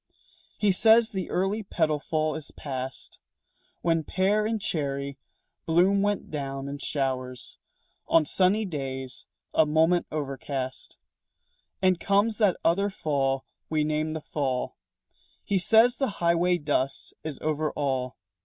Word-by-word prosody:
He 205 -2 +3
says 225 +4 +5
the 190 -3 -3
early 195 +4 0
petal 160 -6 0
fall 155 +1 -1
is 155 -1 -5
past 130 -2 -6 0.6
When 165 -1 +2
pear 205 +6 +1
and 225 0 -1
cherry 140 -8 -3 0.5
bloom 180 +5 +4
went 205 0 -1
down 135 -2 -4
in 140 0 -5
showers 130 -3 -3 0.5
On 160 -2 +4
sunny 195 +7 +2
days 130 -6 -5 0.3
a 160 - +4
moment 160 +3 +3
overcast; 135 -3 -4 0.9
And 185 -2 +4
comes 205 +2 +2
that 205 -5 +3
other 200 +5 +3
fall 135 -7 -1 0.2
we 155 -1 +1
name 155 +1 -1
the 160 - -4
fall. 135 -4 -2 0.7
He 200 -2 +1
says 225 +7 +5
the 270 - +1
highway 170 +1 +3
dust 145 -4 -1
is 155 -4 -4
over 155 0 -1
all. 130 -3 -2
155 Hz, 130 wpm, -27 LUFS, 140-190 Hz, 0.9 s, says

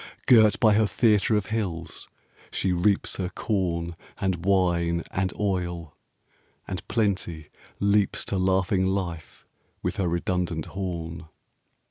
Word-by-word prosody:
Girt 110 -4 +6
by 110 -2 +5
her 110 0 +3
theatre 105 -1 +3
of 105 - -1
hills, 90 -7 -3 0.4
she 95 -1 0
reaps 95 +3 +1
Her 90 -2 -2
corn, 85 -5 -2 0.2
and 90 -3 -1
wine, 85 -3 +2
and 95 0 -1
oil, 85 -5 -2 0.7
and 95 -1 -5
Plenty 95 -8 -1 0.3
leaps 100 0 +2
5 - - -4
To 100 - -1
laughing 95 0 +2
life, 90 -4 -4 0.4
with - - -2
her 95 - 0
redundant 85 -1 -1
horn. 85 -4 -5
95 Hz, 125 wpm, -26 LUFS, 85-100 Hz, 0.7 s, Girt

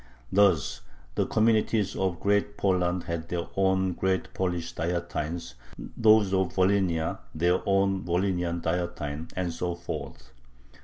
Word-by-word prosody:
Thus 95 -7 +3 0.3
the - - 0
communities 110 -2 +2
of 95 -3 -1
Great 100 0 +1
Poland 90 -2 +1
had 85 -1 -4
their 85 -1 -2
own 95 -1 +2
Great 95 +1 -1
Polish 90 -3 -2
"Dietine," 85 -3 -3 0.4
those 110 -3 +5
of 95 -2 +1
Volhynia 95 -4 +1 0.2
their 90 +3 +2
own 95 -1 +2
Volhynian 90 -1 -1
"Dietine," 80 -3 -3
and 90 -2 -2
so 85 +1 -2
forth. 70 -7 -7
90 Hz, 120 wpm, -27 LUFS, 85-95 Hz, 0.4 s, those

